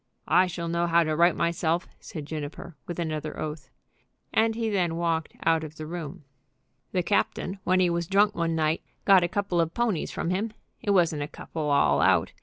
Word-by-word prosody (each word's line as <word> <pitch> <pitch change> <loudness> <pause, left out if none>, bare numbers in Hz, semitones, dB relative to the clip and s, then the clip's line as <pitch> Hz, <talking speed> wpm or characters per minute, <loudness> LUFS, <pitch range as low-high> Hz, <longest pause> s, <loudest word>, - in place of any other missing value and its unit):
"I 185 - +5
shall 170 -1 -4
know 170 +1 0
how 170 0 +4
to 155 -1 -1
right 170 +2 +4
myself," 170 0 0
said 155 -6 -7
Juniper, 155 +2 -6
with 175 - -5
another 155 -3 -3
oath. 150 -3 -5 0.6
And 225 0 +3
he 230 0 -1
then 180 -6 0
walked 165 -2 -1
out 165 -1 +3
of 155 0 -8
the 155 - -7
room. 155 -3 -7 0.7
"The 180 - 0
captain, 190 +2 0
when 185 +1 +3
he 180 -1 +4
was 170 -1 -1
drunk 205 +2 +4
one 165 -2 -1
night, 155 0 +1 0.2
got 195 -2 +7
a - - +2
couple 190 -2 0
of 165 0 -2
ponies 230 -9 0
from 170 - -2
him. 210 +4 -1 0.3
It - - -4
wasn't 170 -6 +3
a 145 - -2
couple 155 0 -5
all 140 -1 +3
out. - - +3
170 Hz, 200 wpm, -27 LUFS, 155-185 Hz, 0.7 s, got